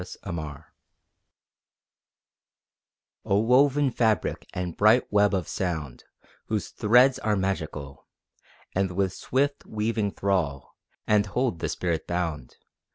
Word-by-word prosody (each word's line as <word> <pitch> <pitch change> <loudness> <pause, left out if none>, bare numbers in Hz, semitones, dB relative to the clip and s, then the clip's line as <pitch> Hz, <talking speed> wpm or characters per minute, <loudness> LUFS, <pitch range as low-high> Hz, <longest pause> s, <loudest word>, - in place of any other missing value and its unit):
ODE 90 - -8 0.2
TO 95 - -5
MUSIC 75 -2 -6 2.6
O 100 - +1
woven 135 +5 +3
fabric 110 -6 0
and 90 -2 -4
bright 110 +4 +5
web 105 0 +4
of 90 -4 -2
sound, 80 -9 -4 0.4
Whose 110 -2 -2
threads 125 +4 +4
are 105 -1 0
magical, 80 -8 -4 0.7
And 95 -1 0
with 95 0 0
swift 140 +7 -1
weaving 110 -1 -1
thrall 80 -9 -1 0.3
And 105 -1 +3
hold 125 -4 -1
the - - -2
spirit 85 -3 -2
bound! 85 -7 -3
100 Hz, 115 wpm, -26 LUFS, 85-110 Hz, 2.6 s, bright